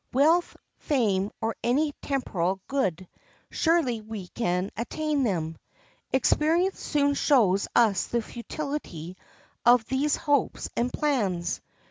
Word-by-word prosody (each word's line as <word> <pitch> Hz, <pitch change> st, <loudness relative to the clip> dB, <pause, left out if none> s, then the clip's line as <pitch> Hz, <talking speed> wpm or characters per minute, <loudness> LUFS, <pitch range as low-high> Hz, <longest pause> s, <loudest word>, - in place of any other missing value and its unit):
Wealth, 320 Hz, +7 st, +3 dB, 0.2 s
fame, 205 Hz, -9 st, +1 dB
or 225 Hz, 0 st, -1 dB
any 290 Hz, +5 st, +2 dB
temporal 195 Hz, -9 st, -1 dB
good—surely 255 Hz, -, -1 dB
we 215 Hz, -4 st, -7 dB
can 180 Hz, -4 st, -1 dB
attain 295 Hz, +5 st, -1 dB
them! 165 Hz, -9 st, -1 dB, 0.5 s
Experience 325 Hz, +7 st, +2 dB
soon 285 Hz, -1 st, +1 dB
shows 215 Hz, -10 st, +3 dB
us 210 Hz, -6 st, +3 dB
the 235 Hz, -1 st, -1 dB
futility 235 Hz, -, -6 dB, 0.5 s
of 240 Hz, -1 st, +5 dB
these 275 Hz, +4 st, +1 dB
hopes 290 Hz, -4 st, 0 dB
and 245 Hz, +1 st, 0 dB
plans. 205 Hz, -, -1 dB
240 Hz, 105 wpm, -27 LUFS, 195-290 Hz, 0.5 s, of